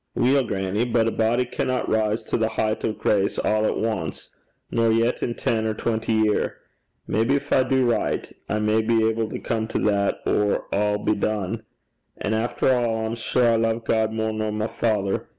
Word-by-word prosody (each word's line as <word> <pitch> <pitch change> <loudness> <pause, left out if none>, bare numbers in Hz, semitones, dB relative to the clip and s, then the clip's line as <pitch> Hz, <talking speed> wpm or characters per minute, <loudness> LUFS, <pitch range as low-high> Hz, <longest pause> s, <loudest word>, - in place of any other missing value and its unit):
'Weel, 135 +2 +3
grannie; 95 +3 -1
but 115 -2 +2
a - - +1
body 115 +3 +1
canna 125 +1 -1
rise 110 0 +1
to - - -3
the 110 -1 +2
heicht 110 -1 -1
o' - - +1
grace 100 -2 0
a' - - -2
at 110 0 +1
ance, 110 -8 -3 0.4
nor 115 -1 +2
yet 115 +2 +1
in 120 - -2
ten, 110 -1 0
or 110 - -1
twenty 115 0 -1
year. 110 -1 +1 0.5
Maybe 115 +7 +1
gin - - -6
I - - +5
do 130 -2 +3
richt, 120 - -1 0.2
I 105 - 0
may 105 +1 +2
be 110 0 +2
able 110 0 -1
to - - -4
come 110 -1 -2
to - - -2
that 100 0 0
or 105 -1 +1
a' 105 +1 +1
be 105 - 0
dune. 110 +1 -2 0.6
An' 105 - -2
efter 120 +3 0
a', 115 -3 +1
I'm 110 - -2
sure 120 +1 +1
I 115 - +3
love 115 0 0
God 110 -1 +1
mair 110 0 -1
nor 110 0 -2
my 105 0 -2
father. 105 -4 -1
110 Hz, 200 wpm, -24 LUFS, 110-115 Hz, 0.6 s, I